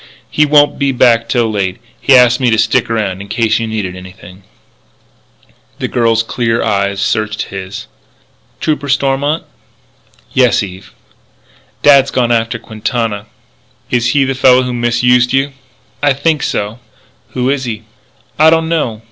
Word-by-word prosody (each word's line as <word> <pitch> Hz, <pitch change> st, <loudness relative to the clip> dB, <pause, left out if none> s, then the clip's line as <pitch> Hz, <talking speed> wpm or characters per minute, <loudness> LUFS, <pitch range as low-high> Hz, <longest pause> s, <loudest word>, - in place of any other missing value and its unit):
"He 150 Hz, 0 st, +2 dB
won't 145 Hz, 0 st, +3 dB
be 140 Hz, -1 st, +1 dB
back 115 Hz, -2 st, +2 dB
till 115 Hz, -3 st, +1 dB
late. 95 Hz, -3 st, -2 dB, 0.2 s
He 135 Hz, -, +5 dB
asked 125 Hz, 0 st, +5 dB
me 125 Hz, -2 st, +2 dB
to 110 Hz, -, +2 dB
stick 115 Hz, +3 st, +1 dB
around 100 Hz, -4 st, -2 dB
in 100 Hz, -, -9 dB
case 110 Hz, +1 st, 0 dB
you 115 Hz, -, -3 dB
needed 105 Hz, -5 st, -4 dB
anything 90 Hz, 0 st, -13 dB, 0.7 s
" -, -, -36 dB
The -, -, -3 dB
girl's 115 Hz, -1 st, +1 dB
clear 115 Hz, 0 st, -1 dB
eyes 100 Hz, -2 st, -1 dB
searched 110 Hz, +1 st, -1 dB
his. 95 Hz, 0 st, -7 dB, 0.7 s
"Trooper 145 Hz, -2 st, -2 dB
Stormont?" 140 Hz, +3 st, 0 dB, 0.9 s
"Yes, 125 Hz, -4 st, +3 dB
Eve." 95 Hz, 0 st, -10 dB, 0.9 s
"Dad's 140 Hz, -2 st, +6 dB
gone 125 Hz, -3 st, 0 dB
after 115 Hz, 0 st, 0 dB
Quintana." 110 Hz, -1 st, -4 dB, 0.6 s
"Is 120 Hz, -1 st, +1 dB
he 145 Hz, -2 st, +3 dB
the 135 Hz, 0 st, -1 dB
fellow 130 Hz, -1 st, +4 dB
who 125 Hz, 0 st, -3 dB
misused 120 Hz, +1 st, +2 dB
you?" 135 Hz, +1 st, +1 dB, 0.5 s
"I 145 Hz, -1 st, +3 dB
think 150 Hz, +2 st, 0 dB
so." 105 Hz, +3 st, -3 dB, 0.5 s
"Who 125 Hz, +1 st, 0 dB
is 135 Hz, -2 st, -2 dB
he?" 110 Hz, -2 st, -5 dB, 0.6 s
"I 155 Hz, +1 st, +7 dB
don't 160 Hz, 0 st, +1 dB
know." 140 Hz, -10 st, -1 dB
120 Hz, 150 wpm, -14 LUFS, 110-135 Hz, 0.9 s, I